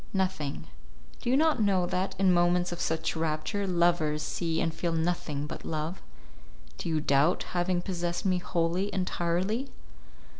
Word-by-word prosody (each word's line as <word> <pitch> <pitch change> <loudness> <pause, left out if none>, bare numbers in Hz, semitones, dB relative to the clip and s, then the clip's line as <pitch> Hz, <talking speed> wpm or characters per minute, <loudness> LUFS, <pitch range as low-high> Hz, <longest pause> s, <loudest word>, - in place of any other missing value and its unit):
"Nothing. 185 -7 -1 0.6
Do - - -2
you 260 - +4
not 310 -5 +3
know 195 -4 +3
that, 185 +2 -1
in 190 -1 +4
moments 175 0 +3
of 175 - -4
such 160 +1 -1
rapture, 160 +6 -1
lovers 170 -4 +2
see 165 0 -1
and 165 - 0
feel 165 +1 -2
nothing 160 -3 -1
but - - -7
love? 160 +3 -3 0.8
Do - - -3
you 160 -1 +1
doubt 145 +3 +3
having 175 0 +1
possessed 175 -2 -2
me 185 -2 +2
wholly, 175 +3 0
entirely?" 185 +6 -1
175 Hz, 150 wpm, -29 LUFS, 160-185 Hz, 0.8 s, you